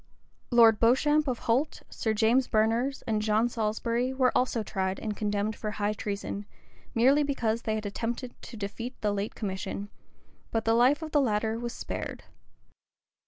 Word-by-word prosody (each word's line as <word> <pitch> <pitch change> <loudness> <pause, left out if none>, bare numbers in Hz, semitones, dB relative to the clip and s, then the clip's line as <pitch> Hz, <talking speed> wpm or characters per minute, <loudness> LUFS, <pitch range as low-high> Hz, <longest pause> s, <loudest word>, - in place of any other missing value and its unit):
Lord 230 -3 +6
Beauchamp 295 +6 +3
of 250 -2 0
Holt, 260 +7 +1
Sir 220 - -1
James 235 +5 +3
Berners, 230 +5 +1
and 215 -2 0
John 215 +2 +2
Salisbury, 230 +2 -1
were 255 -1 +2
also 250 -3 +1
tried 190 -1 -2
and 210 -1 -3
condemned 210 +1 -1
for 215 - -4
high 210 0 -1
treason, 205 -1 -4 0.5
merely 265 +6 +5
because 235 -6 0
they 220 -1 -1
had 215 -1 -4
attempted 235 +4 -3
to 230 - -9
defeat 230 +5 -5
the 210 -1 +1
late 205 +1 -3
commission: 200 0 -4 0.6
but 225 -1 -1
the 225 - +3
life 255 +7 +4
of 310 - -6
the 290 - +4
latter 220 -2 0
was 240 0 -4
spared. - - -5
225 Hz, 165 wpm, -28 LUFS, 210-250 Hz, 0.6 s, Lord